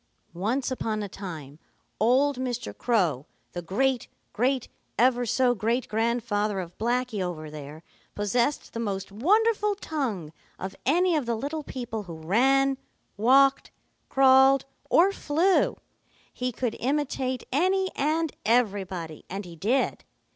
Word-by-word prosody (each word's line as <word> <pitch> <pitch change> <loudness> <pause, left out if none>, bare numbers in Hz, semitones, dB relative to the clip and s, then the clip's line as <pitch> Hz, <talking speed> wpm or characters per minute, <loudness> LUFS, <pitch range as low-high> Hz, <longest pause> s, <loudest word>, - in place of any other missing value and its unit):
"Once 230 +10 -1
upon 220 -4 -2
a - - -4
time 160 -7 -8 0.4
old 260 +5 +3
Mr. 245 -2 -3
Crow, 175 - 0 0.2
the 175 - -5
great 245 +8 0 0.3
great 255 +2 0 0.3
ever 245 0 +3
so 250 +2 +3
great 235 +3 -1
grandfather 215 -2 0
of 175 -1 -7
Blacky, 240 -1 0
over 160 -4 -4
there, 150 +1 -9 0.3
possessed 235 +7 0
the 230 - -4
most 195 -3 -3
wonderful 420 - +2
tongue 235 - -3 0.2
of 190 +1 -6
any 350 +4 +3
of 290 -6 -1
the 235 - 0
little 290 +7 -3
people 240 -5 -5
who 165 - -7
ran, 265 +11 +2 0.4
walked, 270 +6 +4 0.4
crawled, 265 0 +5 0.2
or 370 +4 +5
flew. 355 +1 +2 0.6
He 250 0 -2
could 240 -1 -2
imitate 260 -2 -1
any 375 +7 +2
and 310 +2 0
everybody, 195 -8 0
and 195 +2 -5
he 170 -1 -10
did. 230 - 0
240 Hz, 130 wpm, -26 LUFS, 200-270 Hz, 0.6 s, crawled